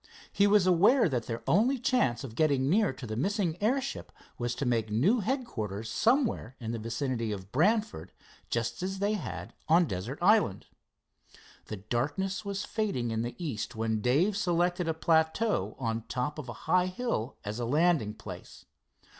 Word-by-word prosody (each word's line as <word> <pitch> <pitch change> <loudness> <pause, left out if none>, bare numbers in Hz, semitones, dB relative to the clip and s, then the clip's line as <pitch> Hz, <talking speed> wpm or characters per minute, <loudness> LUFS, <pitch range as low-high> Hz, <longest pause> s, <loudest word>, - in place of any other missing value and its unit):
He 200 - +3
was 205 -2 +5
aware 200 +7 +5
that 125 -6 -2
their 115 -1 -4
only 235 +10 +3
chance 230 - +1
of 125 -5 -7
getting 140 -1 +2
near 210 -2 +3
to 130 -1 -9
the 110 -2 -4
missing 185 - 0
airship 265 +5 -1 0.3
was 120 0 -1
to 140 - -3
make 115 -3 0
new 155 - +3
headquarters 115 - -3
somewhere 230 - +1
in 115 -2 -4
the 115 - -3
vicinity 115 0 -2
of 95 -1 -6
Brantford, 180 - +1 0.4
just 115 +3 -2
as 190 +1 -3
they 200 +2 0
had 205 -7 -5 0.2
on 170 +2 +6
Desert 110 - -4
Island. 190 - +3 1.0
The 110 - -6
darkness 145 - -2
was 200 0 -3
fading 165 - -2
in 110 0 -1
the 120 +1 -4
east 125 - -4
when 110 -1 -1
Dave 150 - +2
selected 175 -2 +1
a 160 - 0
plateau 160 +7 +1
on 115 -4 -1
the 115 - -9
top 130 +4 -3
of 135 -5 -7
a - - -4
high 185 0 +3
hill 185 - -3
as 105 +3 -4
a 120 - -1
landing 145 -5 +2
place. - - -10
150 Hz, 170 wpm, -29 LUFS, -, 1.0 s, on